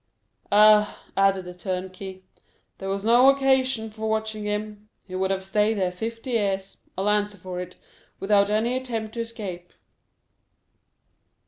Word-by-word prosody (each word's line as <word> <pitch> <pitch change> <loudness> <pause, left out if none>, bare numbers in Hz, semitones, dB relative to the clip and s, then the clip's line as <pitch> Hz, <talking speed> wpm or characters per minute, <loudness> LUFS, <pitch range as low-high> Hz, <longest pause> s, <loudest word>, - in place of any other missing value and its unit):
"Ah," 210 0 +5
added 195 -1 +2
the 180 - -8
turnkey, 185 +1 -6 0.6
"there 195 - -5
was 195 +1 -2
no 240 +4 +7
occasion 265 -4 +2
for 220 0 -4
watching 220 -1 -2
him; 210 0 -4 0.2
he 185 - -12
would 190 +1 0
have 190 0 -1
stayed 210 +3 +1
here 185 -2 0
fifty 225 +6 -5
years, 195 -4 -1 0.2
I'll 195 +2 -1
answer 210 0 +1
for 180 -1 -6
it, 180 0 -7 0.4
without 200 0 +3
any 220 +4 +1
attempt 230 -4 -4
to 235 - -3
escape." 200 -7 -7
210 Hz, 140 wpm, -25 LUFS, 190-220 Hz, 0.6 s, no